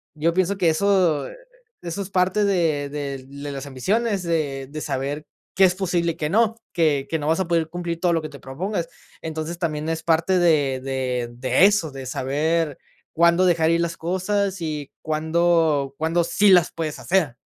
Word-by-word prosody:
Yo 160 +2 +1
pienso 185 +2 +1
que 180 -4 +3
eso 175 -3 +2 0.5
eso 175 +4 -4
es 195 - -6
parte 190 +1 +2
de 165 -7 +1
de 140 -2 -5
de 140 +1 -7
las 140 0 -6
ambiciones, 195 - -1
de 145 -6 -2
de 155 - -5
saber 145 +2 -3 0.3
qué 190 - +6
es 180 -1 +2
posible 175 -3 0
y - - -18
qué 150 - -2
no, 225 +2 +3 0.2
que 150 -5 +1
que 160 - -1
no 145 - -3
vas 160 +3 +2
a 190 - -1
poder 165 -2 +1
cumplir 170 -1 -4
todo 175 0 +2
lo 165 - +1
que 155 - -5
te 140 -2 -12
propongas. 170 +8 -4 0.3
Entonces, 160 +1 -4
también 155 -3 -2
es 165 0 -2
parte 165 +3 +2
de 145 -6 +2
de 130 -2 -2
de 130 +7 +3
eso, 200 -7 +2
de 135 -1 -8
saber 145 +3 -1 0.4
cuándo 170 +2 +4
dejar 165 -3 +3
ir 170 - +2
las 170 -1 -2
cosas 190 +2 -1
y 150 -3 -4
cuándo 160 -2 +1
cuándo 165 +2 +1
sí 205 +4 +3
las 180 -3 +5
puedes 160 -2 -4
hacer. 170 -9 +1
165 Hz, 190 wpm, -23 LUFS, 145-180 Hz, 0.5 s, qué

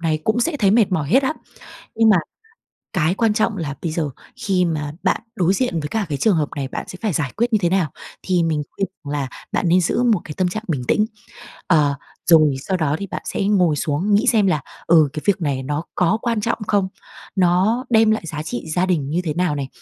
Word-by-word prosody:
này 160 -2 0
cũng 220 +2 +1
sẽ 295 +5 0
thấy 200 -7 +3
mệt 215 -1 +4
mỏi 150 -5 0
hết 265 - +4
á. 265 - +1 0.6
Nhưng 225 -1 +4
mà 195 - +6 0.8
cái 175 -2 +1
quan 225 +1 +2
trọng 215 -1 +1
là 150 -5 -3
bây 165 -3 -2
giờ 155 -3 -1 0.3
khi 185 -2 +1
mà 150 -3 -2
bạn - - +1 0.2
đối 180 0 +2
diện 190 -8 0
với 150 - -4
cả 215 +2 -1
cái 145 -3 -2
trường 200 +3 +3
hợp 150 -2 0
này, 135 -2 -3
bạn - - -6
sẽ 185 - -8
phải 215 -5 0
giải 145 -4 -1
quyết 235 +2 0
như 215 - +4
thế 170 - +3
nào? 185 -5 +1 0.3
Thì 180 -2 +1
mình 155 -2 0
khuyên 195 - -2 0.2
rằng 145 - -5
là 140 -3 -2 0.2
bạn 175 - 0
nên 180 +2 +5
giữ 180 +7 +1
một 225 -6 +3
cái 150 - -7
tâm 185 -1 +1
trạng 215 +5 -4
bình 135 -7 -1
tĩnh, 215 0 +3 0.6
ờ, 150 -5 +3 0.3
rồi 155 -4 +6
sau 190 +3 -1
đó 150 -4 0
thì 200 - -5
bạn - - -5
sẽ - - -2
ngồi 185 -6 +3
xuống 155 +7 0
nghĩ 210 - +2
xem 215 -4 +4
là, 155 -6 +1 0.3
ừ, 160 -3 +5
cái 155 - -4
việc 200 -2 +2
này 140 -4 -1
nó 145 +3 -2
có 180 +5 +2
quan 230 -3 0
trọng 230 - -1
không? 200 -2 +2 0.5
Nó 190 +7 +2
đem 220 -2 +5
lại 215 - 0
giá 155 -1 -5
trị 120 -6 -5
gia 180 +1 +2
đình 155 -7 0
như 165 +4 0
thế 155 - -2
nào 175 -3 0
này, 140 -2 -3
180 Hz, 245 wpm, -21 LUFS, 150-210 Hz, 0.8 s, mà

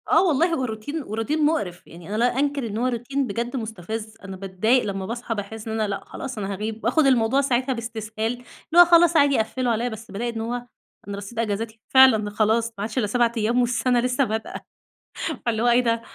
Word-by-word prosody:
آه - - +5
والله 335 +2 +2
هو 265 -5 0
روتين، 245 +7 -5
وروتين 260 +8 -1
مُقرف، 205 - -1
يعني 170 +2 -12
أنا 210 - -2
لا 245 +3 +1
أنكِر 280 -3 0
إن 210 0 -4
هو 245 +2 +1
روتين 255 +3 -2
بجد 235 +5 -3
مُستفز، 220 -1 -5
أنا 195 -1 -7
باتضايق 195 +6 +1
لما 195 -2 -3
باصحى 235 +1 -4
باحسّ 215 +2 -6
إن 220 - -3
أنا 215 - +1
لأ، 195 -1 -4
خلاص 265 -3 -7
أنا 200 -1 -3
هاغيب 215 +3 -5
وآخد 265 +7 +3
الموضوع 260 0 +3
ساعتها 260 0 0
باستسهال، 220 -2 -5
اللي 245 - -11 0.4
هو 350 - +11
خلاص 340 -1 +5
عادي 285 -2 +4
قفِّلوا 245 +3 0
عليَّ، 235 +2 0
بس 220 0 -9
بالاقي 235 +4 -3
إن 225 - -3
هو 230 +2 -3 0.5
أنا 200 0 -5
رصيد 205 +3 -7
أجازاتي 225 0 -2
فعلًا 260 -6 +6
خلاص، 220 +2 +1
ما - - -32
عادش 215 +4 -4
إلّا 225 -5 +2
7 235 +2 +2
أيام 230 +3 +2
والسنة 245 0 +1
لسه 250 +2 +1
بادئة 220 -2 -4 0.8
فاللي 225 -2 0
هو - - +3
إيه 240 +1 +5
ده! 230 -1 +1
230 Hz, 210 wpm, -23 LUFS, 215-255 Hz, 0.8 s, هو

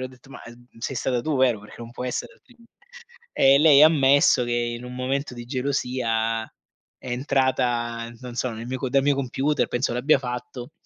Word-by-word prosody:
le 130 - -3
ho - - -12
detto: 130 +1 -19
"Ma, - - -11
ehm, 120 +1 -14
sei 125 +3 -4
stata 125 0 -1
tu, 155 -3 -1
vero? 125 -5 +2
Perché 105 - -14
non 115 0 -9
può 125 - -6
essere 125 - -4
altrimenti." 245 - -24 0.6
E 135 +1 +5
lei 150 -1 +7
ha 155 - +10
ammesso 140 -4 +4
che 120 - -3
in 120 0 -2
un 125 - -8
momento 130 +1 -3
di 120 - -8
gelosia, 125 -4 -1 0.6
è - - -10
entrata, 120 -3 -1
non 125 -2 -8
so, 130 - -1
nel 115 +1 -7
mio 130 +1 -4
co 130 - -3
dal 135 0 +3
mio 145 +1 +2
computer 140 +3 0
penso 120 0 -1
l'abbia 135 +4 +3
fatto, 125 +2 -7
125 Hz, 205 wpm, -24 LUFS, 120-135 Hz, 0.6 s, ha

